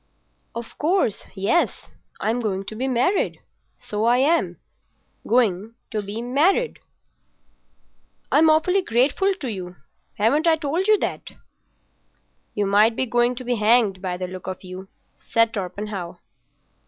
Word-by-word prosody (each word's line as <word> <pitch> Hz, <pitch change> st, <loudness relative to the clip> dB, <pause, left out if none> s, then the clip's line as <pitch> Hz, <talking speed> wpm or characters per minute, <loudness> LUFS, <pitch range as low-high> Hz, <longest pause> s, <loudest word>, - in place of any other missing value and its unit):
"Of 235 Hz, 0 st, -8 dB
course, 320 Hz, -, 0 dB
yes. 200 Hz, -, 0 dB, 0.3 s
I'm 230 Hz, +3 st, 0 dB
going 195 Hz, -4 st, -2 dB
to 215 Hz, -, -7 dB
be 255 Hz, +4 st, -2 dB
married—so 250 Hz, -, -2 dB
I 240 Hz, +1 st, +4 dB
am. 300 Hz, +6 st, +2 dB, 0.7 s
Going 225 Hz, -2 st, +1 dB, 0.2 s
to 215 Hz, -, -1 dB
be 205 Hz, +3 st, -5 dB
married. 325 Hz, -, +1 dB, 1.5 s
I'm 315 Hz, +2 st, +5 dB
awfully 360 Hz, +5 st, +3 dB
grateful 300 Hz, -, +2 dB
to 265 Hz, -, -4 dB
you. 180 Hz, -3 st, -7 dB, 0.4 s
Haven't 285 Hz, +10 st, +2 dB
I 325 Hz, -, +6 dB
told 320 Hz, +5 st, -1 dB
you 430 Hz, 0 st, +6 dB
that?" -, -, -4 dB, 1.2 s
"You 205 Hz, -, +1 dB
might 210 Hz, +3 st, +4 dB
be 260 Hz, -, 0 dB
going 240 Hz, +1 st, +1 dB
to 255 Hz, -, -7 dB
be 245 Hz, -1 st, -1 dB
hanged 215 Hz, -3 st, +3 dB
by 180 Hz, -2 st, -3 dB
the 185 Hz, -, -3 dB
look 185 Hz, 0 st, -9 dB
of 185 Hz, 0 st, -6 dB
you," 185 Hz, +1 st, -9 dB, 0.4 s
said 230 Hz, 0 st, +3 dB
Torpenhow. 190 Hz, -2 st, -5 dB
230 Hz, 135 wpm, -23 LUFS, 200-285 Hz, 1.5 s, I